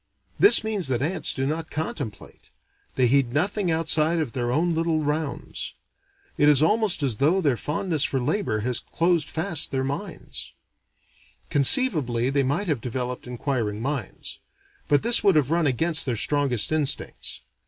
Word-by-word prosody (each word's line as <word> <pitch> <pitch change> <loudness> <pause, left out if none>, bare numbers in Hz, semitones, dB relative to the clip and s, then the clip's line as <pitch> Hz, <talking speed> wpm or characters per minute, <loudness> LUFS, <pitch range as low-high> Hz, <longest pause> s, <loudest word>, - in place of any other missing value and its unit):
This 405 - +6
means 210 -7 0
that 130 -1 -1
ants 175 +5 0
do 135 - -2
not 160 +3 -3
contemplate: 145 -7 -6 0.5
they 130 - +2
heed 125 -1 +2
nothing 185 +5 0
outside 160 0 +2
of 155 -7 -2
their 120 -1 -2
own 165 +6 +1
little 165 -1 0
rounds. 150 0 -4 0.6
It 145 - +5
is 145 -3 +5
almost 210 -2 +2
as 125 -6 0
though 160 - +2
their 145 -8 +1
fondness 155 +4 -1
for 135 - 0
labor 125 - -1
had 125 +2 -1
closed 170 -3 +1
fast 160 -1 -3
their 130 -1 -2
minds. 160 +7 -6 1.0
Conceivably 140 - +3
they 140 0 +1
might 145 +10 -1
have 145 -8 -1
developed 125 +1 -4
inquiring 120 -4 -3
minds. 130 -3 -5 0.5
But 145 - +2
this 235 0 +3
would 195 -4 +4
have 150 -2 +2
run 165 -2 +2
against 160 +4 +3
their 120 -3 -1
strongest 135 -4 +1
instincts. 155 -3 -1
145 Hz, 155 wpm, -24 LUFS, 130-165 Hz, 1.0 s, This